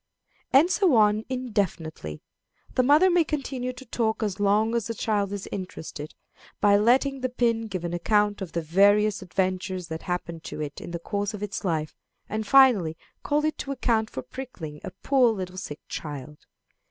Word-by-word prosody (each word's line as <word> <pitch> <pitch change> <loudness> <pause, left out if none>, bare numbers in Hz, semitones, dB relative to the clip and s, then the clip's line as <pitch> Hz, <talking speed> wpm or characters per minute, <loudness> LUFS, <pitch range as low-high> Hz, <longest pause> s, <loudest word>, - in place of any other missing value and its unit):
'" - - -37
And 305 +7 +6
so 370 -10 +3
on 215 0 +4
indefinitely. 185 - -3 0.5
The - - +3
mother 300 +8 +5
may 350 -1 +4
continue 265 -5 -3
the 255 +1 -12
talk 225 -2 -1
as 205 -2 -2
long 210 +3 +2
as 235 -3 0
the 230 - -4
child 205 -2 0
is 200 -1 -5
interested, 160 -5 -6 0.4
by 205 -1 +5
letting 260 +6 +3
the 255 - 0
pin 230 -2 0
give 185 -4 -4
an 170 - -3
account 205 +3 +1
of 185 -4 -6
the 170 - -1
various 200 +5 +4
adventures 185 -1 -2
that 160 0 -5
happened 170 -2 -4
to - - -6
it 150 -2 -5
in - - -7
the 170 - -3
course 200 +4 -3
of 210 - -7
its 205 -1 -4
life, 160 -5 -1 0.3
and 215 0 -3
finally 220 -13 +5 0.2
call 295 +1 +1
it 310 - -1
to 275 - -4
account 230 -4 +1
for - - -6
pricking 170 - -8
a - - -4
poor 245 +6 +2
little 185 -3 -5
sick 150 -5 -6
child. 150 -1 -7
205 Hz, 185 wpm, -26 LUFS, 180-250 Hz, 0.5 s, And